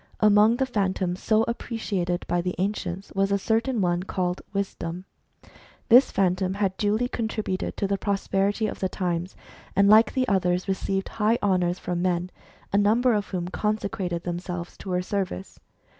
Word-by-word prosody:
Among 215 Hz, +1 st, +5 dB
the 265 Hz, -, +1 dB
Phantoms 190 Hz, -6 st, -1 dB
so 220 Hz, 0 st, +3 dB
appreciated 205 Hz, -7 st, -2 dB
by 175 Hz, 0 st, +1 dB
the 180 Hz, +1 st, -3 dB
ancients 190 Hz, -1 st, -3 dB
was 195 Hz, 0 st, +1 dB
a 200 Hz, -, +3 dB
certain 225 Hz, +3 st, 0 dB
one 175 Hz, -1 st, +1 dB
called 180 Hz, -1 st, -2 dB
Wisdom. 185 Hz, -3 st, -4 dB, 0.8 s
This 245 Hz, +3 st, +7 dB
Phan 185 Hz, -2 st, +2 dB
tom 185 Hz, 0 st, -2 dB
had 195 Hz, -2 st, 0 dB
duly 215 Hz, +4 st, +1 dB
contributed 220 Hz, -5 st, -3 dB
to -, -, 0 dB
the 200 Hz, 0 st, -1 dB
prosperity 200 Hz, +1 st, 0 dB
of 215 Hz, -, -4 dB
the 190 Hz, -, -1 dB
times, 180 Hz, -1 st, -2 dB, 0.4 s
and 200 Hz, 0 st, +5 dB
like 215 Hz, +1 st, +6 dB
the 260 Hz, -1 st, +1 dB
others 180 Hz, -2 st, +1 dB
received 195 Hz, 0 st, -1 dB
high 220 Hz, +3 st, +4 dB
honour 180 Hz, -3 st, +2 dB
from 175 Hz, -1 st, -3 dB
men, 180 Hz, 0 st, 0 dB, 0.4 s
a -, -, +4 dB
_ -, -, +5 dB
number 235 Hz, +4 st, +3 dB
of 205 Hz, -2 st, 0 dB
whom 180 Hz, -1 st, -3 dB
consecrated 195 Hz, -4 st, -2 dB
themselves 175 Hz, 0 st, -5 dB
to 195 Hz, -, -9 dB
her 180 Hz, 0 st, 0 dB
service. 185 Hz, -, -4 dB
195 Hz, 170 wpm, -25 LUFS, 180-210 Hz, 0.8 s, This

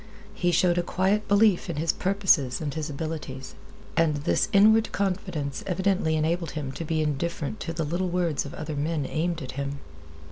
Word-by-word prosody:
He 175 Hz, -1 st, +1 dB
showed 175 Hz, +1 st, +3 dB
a -, -, +3 dB
quiet 190 Hz, +4 st, 0 dB
belief 205 Hz, -2 st, +4 dB
in -, -, -2 dB
his 160 Hz, +3 st, +1 dB
purposes 185 Hz, -10 st, +2 dB
and 145 Hz, -3 st, -3 dB
his 155 Hz, 0 st, -3 dB
abilities. 145 Hz, -3 st, -5 dB, 0.4 s
And 165 Hz, -2 st, +3 dB
this 145 Hz, +1 st, +1 dB
inward 220 Hz, +3 st, +5 dB
confidence 180 Hz, -7 st, -2 dB
evidently 185 Hz, -3 st, +1 dB
enabled 165 Hz, +1 st, 0 dB
him 140 Hz, -3 st, -3 dB
to 150 Hz, -, -6 dB
be 155 Hz, -1 st, 0 dB
indifferent 155 Hz, +5 st, -2 dB
to 165 Hz, -2 st, -3 dB
little 175 Hz, +4 st, -1 dB
words 170 Hz, -4 st, 0 dB
of 140 Hz, -, -8 dB
other 155 Hz, -1 st, -5 dB
men 150 Hz, 0 st, -1 dB
aimed 165 Hz, +2 st, -2 dB
at 130 Hz, -, -6 dB
him. 140 Hz, +1 st, -4 dB
165 Hz, 175 wpm, -26 LUFS, 150-185 Hz, 0.4 s, inward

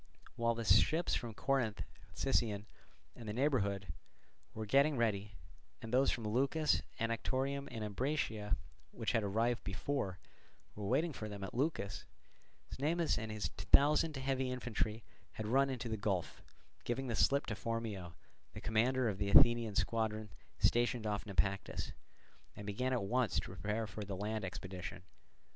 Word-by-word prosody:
While 115 Hz, 0 st, +1 dB
the 115 Hz, 0 st, -4 dB
ships 135 Hz, -, +4 dB
from 115 Hz, -3 st, -2 dB
Corinth, 130 Hz, -5 st, 0 dB, 0.3 s
Sicyon, 110 Hz, -6 st, +1 dB, 0.5 s
and 115 Hz, -3 st, -8 dB
the -, -, -2 dB
neighbourhood 100 Hz, -, 0 dB, 0.6 s
were 110 Hz, 0 st, -3 dB
getting 140 Hz, +6 st, +4 dB
ready, 105 Hz, -3 st, 0 dB, 0.5 s
and 115 Hz, +1 st, -7 dB
those 130 Hz, +2 st, +5 dB
from 120 Hz, -, -2 dB
Leucas, 135 Hz, +8 st, +2 dB, 0.2 s
Anactorium, 130 Hz, +5 st, -1 dB
and 115 Hz, -3 st, -5 dB
Ambracia, 105 Hz, -2 st, -1 dB, 0.3 s
which -, -, -2 dB
had 115 Hz, -, +2 dB
arrived 115 Hz, +4 st, 0 dB
before, 95 Hz, -1 st, -2 dB, 0.6 s
were 105 Hz, -2 st, -5 dB
waiting 150 Hz, +8 st, +2 dB
for 110 Hz, -4 st, -5 dB
them 100 Hz, -1 st, -6 dB
at 95 Hz, -, -5 dB
Leucas, 125 Hz, -, -1 dB, 0.7 s
Cnemus 160 Hz, +5 st, +1 dB
and 110 Hz, -1 st, -4 dB
his 105 Hz, -1 st, -2 dB
thousand 150 Hz, +1 st, +4 dB
heavy 130 Hz, -1 st, 0 dB
infantry 115 Hz, -3 st, -2 dB, 0.3 s
had 110 Hz, -, -5 dB
run 135 Hz, +5 st, +3 dB
into 125 Hz, -2 st, -3 dB
the 110 Hz, -1 st, -2 dB
gulf, 100 Hz, -4 st, -2 dB, 0.4 s
giving 130 Hz, +3 st, -2 dB
the 120 Hz, -3 st, -2 dB
slip 140 Hz, +5 st, +3 dB
to -, -, -3 dB
Phormio, 110 Hz, -6 st, -3 dB, 0.4 s
the -, -, -6 dB
commander 120 Hz, +3 st, +2 dB
of 100 Hz, -3 st, -2 dB
the 100 Hz, -1 st, 0 dB
Athenian 115 Hz, 0 st, +6 dB
squadron 110 Hz, -2 st, 0 dB, 0.3 s
stationed 120 Hz, -1 st, +2 dB
off 105 Hz, 0 st, -2 dB
Naupactus, 100 Hz, 0 st, -1 dB, 0.6 s
and 105 Hz, -, -8 dB
began 125 Hz, +6 st, -1 dB
at 125 Hz, -5 st, +1 dB
once 120 Hz, +3 st, +1 dB
to -, -, +3 dB
prepare 105 Hz, +5 st, -2 dB
for 105 Hz, 0 st, -6 dB
the 100 Hz, -1 st, -4 dB
land 105 Hz, +2 st, -2 dB
expedition. 90 Hz, -2 st, -6 dB
115 Hz, 150 wpm, -36 LUFS, 105-130 Hz, 0.7 s, Athenian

